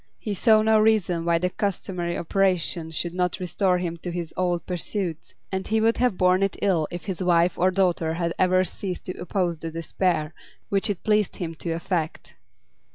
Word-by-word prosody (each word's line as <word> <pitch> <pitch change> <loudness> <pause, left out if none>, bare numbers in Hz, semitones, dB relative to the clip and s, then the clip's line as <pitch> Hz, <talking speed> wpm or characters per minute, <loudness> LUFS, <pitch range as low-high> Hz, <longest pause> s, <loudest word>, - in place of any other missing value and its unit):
He 210 - -4
saw 215 +2 +4
no 220 0 +4
reason 205 -6 +2
why 170 -1 +3
the 180 +2 -1
customary 180 -3 -2
operation 180 -3 0
should 170 +2 -3
not 180 0 -1
restore 180 +1 +1
him 170 -2 -3
to 175 - -6
his 170 -2 -4
old 175 -2 0
pursuits, 180 -2 -4 0.2
and 190 0 -3
he 220 +1 +2
would 225 +1 +3
have 245 -6 +1
borne 185 +1 +4
it 195 0 +1
ill 175 -6 +1
if 175 0 -7
his 190 -3 -4
wife 175 -1 +3
or 185 - +3
daughter 180 -4 +1
had 170 0 -1
ever 185 0 +4
ceased 185 0 -5
to 185 - -5
oppose 175 -3 -1
the 165 - -4
despair 165 -1 -1 0.4
which 195 0 +1
it 200 -4 -3
pleased 210 -2 +2
him 165 -2 -4
to 165 +1 -6
affect. 165 -1 -3
180 Hz, 190 wpm, -25 LUFS, 170-195 Hz, 0.4 s, saw